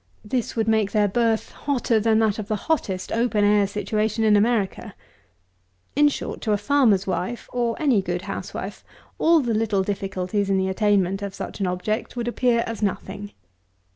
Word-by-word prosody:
This 240 +2 -2
would 225 -1 0
make 220 -2 +2
their 210 -2 +3
birth 225 +2 0
hotter 250 -5 0
than 220 0 +3
that 220 -1 +2
of 205 - -5
the 215 - 0
hottest 200 -7 -2
open 230 -2 +1
air 205 -1 +4
situation 215 +2 -1
in 215 -1 +5
America. 210 -1 0 1.0
In 295 +1 +5
short - - -5
to 215 - 0
a - - +2
farmer's 210 -4 +3
wife, 190 +5 -3
or 240 -2 -1
any 265 -10 +3
good 180 -1 -3
housewife, - - -6 0.4
all 330 -1 +5
the 240 -3 -1
little 215 -3 +1
difficulties 195 0 -2
to 195 - +1
the 190 0 0
attainment 195 -1 +1
of 200 -1 -5
such - - -6
an 195 - 0
object 180 +7 -2
would 240 -1 -3
appear 240 -1 +2
as 230 -1 -5
nothing. 200 0 -3
215 Hz, 175 wpm, -23 LUFS, 195-235 Hz, 1.0 s, in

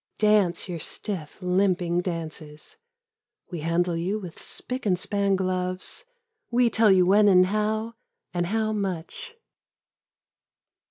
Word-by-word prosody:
Dance 210 -5 +3
your 175 -2 -4
stiff 165 -1 -4
limping 180 -1 +1
dances. 160 -4 -6 0.8
We 175 - -4
handle 170 +2 0
you 180 +5 -1
with 180 -6 -8
spic 255 -3 -3
and 180 -2 +3
span 200 +1 0
gloves. 185 - -2 0.4
We 240 -1 +3
tell 220 -2 +4
you 185 -1 +5
when 205 +3 +5
and 185 -2 +6
how 215 +3 -1 0.4
And 175 -1 0
how 215 +2 0
much. 200 - -4
185 Hz, 120 wpm, -26 LUFS, 175-215 Hz, 0.8 s, and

